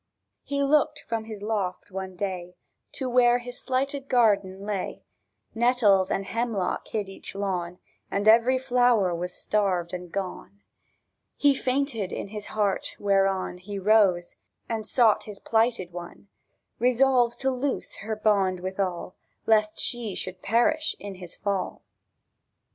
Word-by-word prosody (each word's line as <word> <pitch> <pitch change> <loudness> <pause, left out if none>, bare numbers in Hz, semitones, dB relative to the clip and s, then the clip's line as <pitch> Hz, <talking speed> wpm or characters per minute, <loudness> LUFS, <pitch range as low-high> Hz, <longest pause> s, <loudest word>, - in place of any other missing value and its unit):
He 285 - -3
lookèd 290 +1 +3
from 225 -1 -2
his 215 -2 -8
loft 200 -5 -2
one 190 0 -5
day 180 -2 -4 0.4
To 265 - -2
where 245 -1 +5
his 245 0 -7
slighted 270 +1 -2
garden 200 -5 +2
lay; 205 -3 -3 0.5
Nettles 225 -5 +3
and 195 - -1
hemlock 225 -4 -2
hid 210 -3 -3
each 195 0 -7
lawn, 180 -3 -2 0.3
And 200 +2 -1
every 235 +4 +6
flower 245 -7 +3
was 175 +2 -3
starved 185 -3 -1
and 180 -1 -6
gone. 195 +1 -6 0.7
He 285 -1 +5
fainted 260 -6 -1
in - - -5
his 210 0 -6
heart, 205 -3 -1
whereon 195 -2 +1
He 200 +2 -6
rose, 195 -3 +3 0.3
and 220 -2 -3
sought 230 -4 +3
his 210 -2 -7
plighted 225 -6 0
one, 175 +3 -9 0.5
Resolved 245 0 +3
to 265 0 +2
loose 265 +2 -3
her 220 0 -4
bond 200 -4 +2
withal, 185 -1 -3 0.3
Lest 215 -1 +3
she 230 -5 -1
should 185 0 -5
perish 240 +9 +2
in 200 -1 -7
his 180 -2 -10
fall. 200 -2 -3
210 Hz, 135 wpm, -26 LUFS, 190-240 Hz, 0.7 s, every